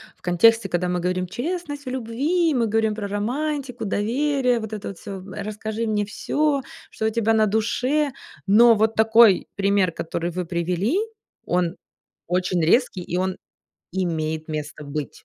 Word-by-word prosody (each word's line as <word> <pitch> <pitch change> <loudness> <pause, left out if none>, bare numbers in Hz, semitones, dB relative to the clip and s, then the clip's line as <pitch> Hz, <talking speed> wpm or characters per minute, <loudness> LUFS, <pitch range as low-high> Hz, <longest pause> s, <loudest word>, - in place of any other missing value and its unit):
в - - -35
контексте, 195 +4 +4
когда 180 +1 0
мы 180 0 0
говорим 180 +1 -1
"честность 290 - -4
в - - -4
любви", 280 +8 0
мы 235 -3 +1
говорим 220 0 +1
про 210 -1 -4
романтику, 250 +4 -3
доверие, 250 +4 +1
вот 220 0 -6
это 210 -1 -5
вот 195 - -9
всё, 200 -2 -7
м, 190 +1 -10
э: - - -5
"Расскажи 220 +2 -4
мне 210 -1 0
всё, 285 +6 0 0.3
что 220 - -2
у - - +3
тебя 225 0 +1
на 215 -1 +4
душе". 250 +7 +1 0.3
Но 230 +4 +7
вот 220 +1 +2
такой 220 -3 +5
пример, 200 -2 +2
который 165 +1 -3
вы 180 +1 -4
привели, 180 - 0 0.5
он 175 0 0 0.5
очень 180 0 0
резкий, 195 +1 +2
и 175 +1 -3
он 185 0 -1 0.6
имеет 160 -4 -2
место 150 -1 -5
быть. 145 -3 -6
215 Hz, 165 wpm, -23 LUFS, 180-240 Hz, 0.6 s, Но